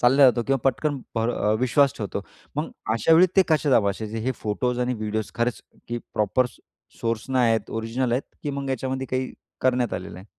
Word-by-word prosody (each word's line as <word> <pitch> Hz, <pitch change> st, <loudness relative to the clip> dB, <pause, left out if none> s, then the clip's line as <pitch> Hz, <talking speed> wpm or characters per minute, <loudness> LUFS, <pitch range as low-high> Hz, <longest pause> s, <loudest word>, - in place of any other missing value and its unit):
चालल्या 135 Hz, +3 st, +6 dB
जातो, 120 Hz, -1 st, +1 dB
किंवा 135 Hz, 0 st, +2 dB
पटकन 140 Hz, +3 st, +1 dB, 0.2 s
भरव 110 Hz, -2 st, +1 dB
विश्वास 135 Hz, +2 st, +4 dB
ठेवतो. 100 Hz, -2 st, -3 dB, 0.4 s
मग -, -, -1 dB, 0.2 s
अशा 115 Hz, +9 st, +3 dB
वेळी 175 Hz, +3 st, +7 dB
ते 190 Hz, -, +8 dB
कसे 155 Hz, -3 st, +2 dB
तपासायचे, 110 Hz, 0 st, +1 dB
हे 125 Hz, +4 st, -1 dB
फोटोज 125 Hz, +2 st, -2 dB
आणि 125 Hz, 0 st, 0 dB
व्हिडिओज 110 Hz, -1 st, -3 dB
खरंच, 120 Hz, 0 st, 0 dB, 0.3 s
की 120 Hz, 0 st, -2 dB, 0.2 s
प्रॉपर 105 Hz, +5 st, +2 dB
सो 120 Hz, -, -16 dB, 0.4 s
सोर्सनं 115 Hz, +3 st, -1 dB
आहेत, 115 Hz, -2 st, +2 dB
ओरिजिनल 115 Hz, +2 st, -1 dB
आहेत, 130 Hz, -, +1 dB, 0.2 s
की 145 Hz, -, -2 dB
मग 140 Hz, -1 st, -3 dB
याच्यामध्ये 130 Hz, +1 st, -2 dB
काही 130 Hz, 0 st, -1 dB, 0.3 s
करण्यात 125 Hz, -2 st, +2 dB
आलेलं 90 Hz, -1 st, -6 dB
आहे? 95 Hz, -, -13 dB
125 Hz, 185 wpm, -25 LUFS, 110-130 Hz, 0.4 s, ते